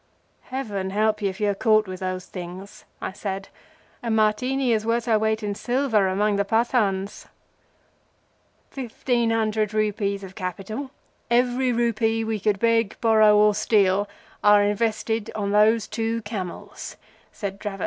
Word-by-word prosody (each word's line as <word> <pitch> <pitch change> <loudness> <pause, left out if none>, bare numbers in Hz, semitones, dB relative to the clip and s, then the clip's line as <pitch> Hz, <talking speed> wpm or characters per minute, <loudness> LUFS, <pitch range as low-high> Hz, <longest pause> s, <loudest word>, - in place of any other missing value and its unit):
"Heaven 210 -8 -4
help 215 +2 +1
you 200 - +1
if 190 +2 -8
you 210 - +1
are - - -1
caught 215 +1 +3
with 185 -1 -6
those 185 -1 -3
things!" 185 +2 -9 0.2
I - - -3
said. 195 0 -5 0.5
"A 235 - -4
Martini 235 +4 +1
is 215 -1 0
worth 230 +1 0
her 225 -3 +3
weight 220 0 0
in 205 -1 -1
silver 240 -3 +1
among 205 +2 +1
the 200 - +2
Pathans." 205 -3 0 1.4
"Fifteen 240 -2 -1
hundred 215 -1 0
rupees 205 -2 0
of 190 -1 -9
capital—every 245 +5 -2
rupee 225 -1 +1
we 220 -1 -2
could 205 0 +1
beg, 230 0 +1
borrow, 215 -2 +5
or 210 0 +5
steal—are 205 0 +2
invested 220 +1 -1
on 200 -2 -2
these 215 +1 +4
two 225 +1 -2
camels," 200 -5 -7 0.3
said 200 -2 -6
Dravot. 200 -2 -5
215 Hz, 140 wpm, -24 LUFS, 200-230 Hz, 1.4 s, borrow